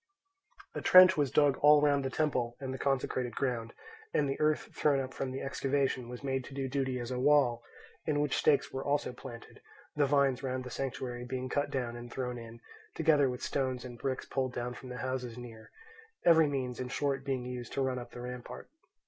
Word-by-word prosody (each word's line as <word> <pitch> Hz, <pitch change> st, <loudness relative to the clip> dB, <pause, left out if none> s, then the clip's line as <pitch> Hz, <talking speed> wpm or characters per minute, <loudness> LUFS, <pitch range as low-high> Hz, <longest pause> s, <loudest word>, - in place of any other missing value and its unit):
A -, -, -4 dB
trench 185 Hz, 0 st, +8 dB
was 145 Hz, -3 st, +1 dB
dug 145 Hz, +1 st, +3 dB
all 150 Hz, 0 st, +7 dB
round 145 Hz, -1 st, +3 dB
the 135 Hz, -, -1 dB
temple 125 Hz, -5 st, -1 dB
and 130 Hz, -1 st, -4 dB
the 130 Hz, -, -6 dB
consecrated 130 Hz, -3 st, -1 dB
ground, 120 Hz, -4 st, -2 dB, 0.4 s
and 145 Hz, -, +3 dB
the 135 Hz, -, -3 dB
earth 155 Hz, 0 st, +1 dB
thrown 145 Hz, -2 st, +3 dB
up 130 Hz, -1 st, -4 dB
from 135 Hz, -, -3 dB
the 130 Hz, +1 st, -5 dB
excavation 135 Hz, -2 st, -1 dB
was 125 Hz, +2 st, -8 dB
made 135 Hz, -1 st, -1 dB
to 135 Hz, -, -10 dB
do 135 Hz, -1 st, -2 dB
duty 130 Hz, -1 st, -1 dB
as 120 Hz, +1 st, -5 dB
a 125 Hz, -, -2 dB
wall, 130 Hz, -4 st, +4 dB, 0.5 s
in 150 Hz, -2 st, +1 dB
which 145 Hz, -2 st, +1 dB
stakes 145 Hz, -2 st, +3 dB
were 135 Hz, -, -3 dB
also 145 Hz, -3 st, 0 dB
planted, 120 Hz, -2 st, -11 dB, 0.3 s
the 145 Hz, -1 st, +3 dB
vines 135 Hz, -2 st, +2 dB
round 130 Hz, -1 st, -3 dB
the 125 Hz, -, -8 dB
sanctuary 125 Hz, -2 st, -4 dB
being 130 Hz, +1 st, -4 dB
cut 145 Hz, +2 st, 0 dB
down 125 Hz, -3 st, -2 dB
and 120 Hz, 0 st, -9 dB
thrown 125 Hz, -2 st, -3 dB
in, 115 Hz, 0 st, -11 dB, 0.3 s
together 150 Hz, -4 st, +4 dB
with 125 Hz, 0 st, -5 dB
stones 130 Hz, -2 st, -1 dB
and 120 Hz, -2 st, -9 dB
bricks 130 Hz, 0 st, -2 dB
pulled 130 Hz, -2 st, -2 dB
down 120 Hz, 0 st, -3 dB
from 125 Hz, +1 st, -10 dB
the 125 Hz, -, -6 dB
houses 125 Hz, -2 st, -3 dB
near; 115 Hz, -3 st, -10 dB, 0.6 s
every 160 Hz, -2 st, +6 dB
means, 130 Hz, -3 st, -3 dB
in 130 Hz, -, -3 dB
short, 135 Hz, +1 st, -1 dB
being 135 Hz, -3 st, -2 dB
used 125 Hz, -1 st, -6 dB
to 135 Hz, -, 0 dB
run 130 Hz, -1 st, -1 dB
up 120 Hz, -, -9 dB
the 120 Hz, -, -9 dB
rampart. 125 Hz, 0 st, -8 dB
130 Hz, 210 wpm, -31 LUFS, 125-140 Hz, 0.6 s, trench